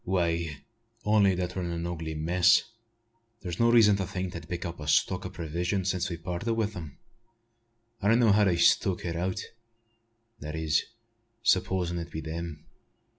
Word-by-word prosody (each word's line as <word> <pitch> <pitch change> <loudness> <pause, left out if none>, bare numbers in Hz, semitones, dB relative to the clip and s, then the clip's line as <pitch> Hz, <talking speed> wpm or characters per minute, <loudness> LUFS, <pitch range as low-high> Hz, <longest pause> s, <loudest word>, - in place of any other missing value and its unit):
"Why, 85 -5 -1 0.4
only 105 -3 +4
that 90 0 -3
we're 95 - -2
in 85 - -3
an 85 0 -3
ugly 80 -2 -4
mess. 85 +3 +4 0.8
There's 85 -2 -5
no 115 - +4
reason 105 -4 +6
to 95 -2 -2
think 95 -1 -4
they - - -5
have - - -15
picked 90 +1 -4
up 85 -1 -6
a 75 - -7
stock - - +2
o' - - -8
provisions, 90 +4 -2
since 90 +1 -2
we 85 - -4
parted 90 +7 -3
wi' 115 -1 +1
them. 85 -9 -8 1.0
I 100 - 0
don't 115 +2 +5
know 115 -3 +5
how 105 +1 +4
they've 85 -3 +2
stuck 90 +2 +3
it 85 -1 -2
out, 90 +3 -2 1.0
that 75 +1 -6
is, 80 -1 +1 0.6
supposin' 90 -4 +1
it 85 0 -6
be 80 - -5
them. 80 -1 -6
90 Hz, 180 wpm, -28 LUFS, 85-95 Hz, 1.0 s, reason